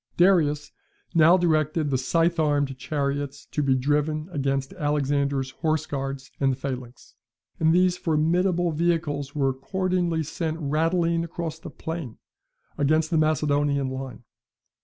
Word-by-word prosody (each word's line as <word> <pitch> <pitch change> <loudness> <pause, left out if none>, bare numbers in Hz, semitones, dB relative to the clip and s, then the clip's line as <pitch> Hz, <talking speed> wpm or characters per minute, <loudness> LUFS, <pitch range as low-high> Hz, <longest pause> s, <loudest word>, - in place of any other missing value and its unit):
] - - -40
Darius, 155 -5 +3 0.4
now 165 +2 +6
directed 155 -3 +1
the 130 - +2
scythe 165 +5 +1
armed 145 -3 +1
chariots 140 +1 -3
to 150 - -1
be 135 -2 +2
driven 150 +4 0
against 135 -2 -1
Alexander's 140 -3 0
horse 155 +1 -1
guards 135 -1 -5
and 135 -1 +3
the - - -1
phalanx; 125 -3 -7 0.5
and 160 0 +4
these 180 +1 +3
formidable 175 +2 +1
vehicles 155 -3 -1
were 135 -2 +2
accordingly 175 +4 -1
sent 160 +1 -3
rattling 165 +3 +1
across 165 -1 -5
the - - -8
plain, 160 -8 -6 0.6
against 155 +3 +2
the 165 - +2
Macedonian 145 -2 +1
line. 130 -2 -7
150 Hz, 135 wpm, -25 LUFS, 140-165 Hz, 0.6 s, now